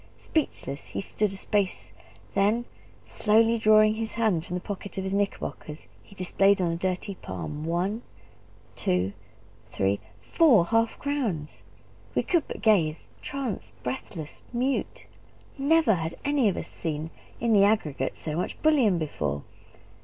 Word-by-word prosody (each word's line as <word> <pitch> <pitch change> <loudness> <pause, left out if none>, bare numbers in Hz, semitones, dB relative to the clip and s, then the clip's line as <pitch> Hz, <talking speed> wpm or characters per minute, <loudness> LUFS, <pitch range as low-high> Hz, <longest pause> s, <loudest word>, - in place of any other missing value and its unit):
Speechless 145 - -2
he - - -5
stood 210 +1 -1
a - - -5
space: 195 -1 -1 0.4
then, 210 +5 +2 0.4
slowly 225 +2 +3
drawing 215 0 +6
his 220 0 -2
hand 215 -8 +2
from 180 - -5
the - - -1
pocket 200 +1 -7
of 190 - -1
his 190 0 -2
knickerbockers, 195 -6 -3 0.2
he 200 - -18
displayed 195 +2 +3
on 175 -2 +1
a - - -1
dirty 185 +3 -2
palm 150 -4 -6
one 180 +7 -1 0.7
two 90 +2 0 0.6
three 100 +1 0 0.2
four 230 - +4
half 225 +3 +1
crowns! 230 - -2 0.5
We - - +2
could 345 -4 +1
but - - -7
gaze 170 -8 +2
tranced, 270 -6 -4
breathless, 165 - -6
mute; 255 +3 -1 0.5
never 300 -3 +4
had 165 -2 -2
any 280 -6 +3
of 190 - -3
us - - -4
seen, 160 -1 -4 0.3
in 230 -1 +2
the 200 -2 +6
aggregate, 155 -11 0
so 155 -1 -4
much 175 - -3
bullion 265 - +4
before. 75 - -2
200 Hz, 145 wpm, -27 LUFS, 165-225 Hz, 0.7 s, drawing